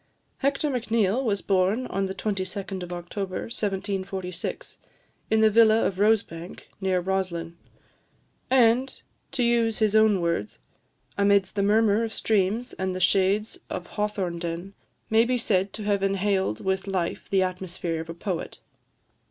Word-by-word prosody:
Hector 280 +2 0
Macneill 230 -1 +1
was 205 -5 -1
born 195 +6 +2
on 195 -4 -1
the 190 - -5
22d 195 -1 -3
of 180 0 -7
October 185 +2 -4
1746, 195 -4 -4 0.5
in 220 0 +3
the 220 - +6
villa 225 0 +5
of 190 -1 -2
Rosebank, 200 -5 0
near 190 -1 +1
Roslin; 175 -2 -2 0.9
and, 255 0 +4
to - - -14 0.3
to 260 -3 +1
use 235 -2 +2
his 215 -1 +2
own 215 -3 +5
words, 170 -11 -2 0.6
"amidst 200 -1 +3
the 200 - +1
murmur 210 +1 +3
of 225 -1 -3
streams 215 +3 0
and 190 -1 -1
the - - -3
shades 195 +3 +2
of 175 - -5
Hawthornden, 180 -3 -3 0.4
may 220 +1 +6
be 250 +1 +1
said 195 -4 +1
to 215 - -6
have 205 -1 +1
inhaled 195 - 0
with 190 +1 -1
life 185 -3 -2
the 190 -1 +3
atmosphere 180 -3 -3
of 165 - -10
a 165 - -6
poet." 180 -1 -4
195 Hz, 145 wpm, -26 LUFS, 185-220 Hz, 0.9 s, the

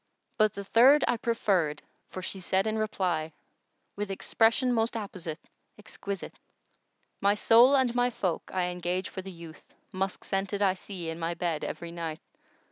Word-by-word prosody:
But 215 -2 +2
the 200 - -5
third 260 +8 +6
I - - +3
preferred 190 -10 0 0.3
for 185 - -7
she 190 - -4
said 190 +2 +1
in 220 0 0
reply, 180 -7 -1 0.3
* - - -48
With 205 0 -3
expression 230 +5 +2
most 230 0 +1
apposite, 185 -7 -5 0.4
exquisite:— 200 -2 -7 0.8
My 200 +1 +4
soul 235 +5 +6
and 260 -3 +3
my 245 0 +2
folk 185 -8 -3
I 180 -1 0
engage 180 +1 -2
for 190 - -6
the 190 - -8
youth 165 -3 -13
* - - -43
Musk 190 0 -3
scented 195 +1 -1
I 190 -2 +4
see 185 -3 -7
in 165 +1 -5
my 165 +1 -2
bed 165 -2 -2
every 170 -1 -5
night! 165 -2 -5
195 Hz, 170 wpm, -29 LUFS, 175-220 Hz, 0.8 s, third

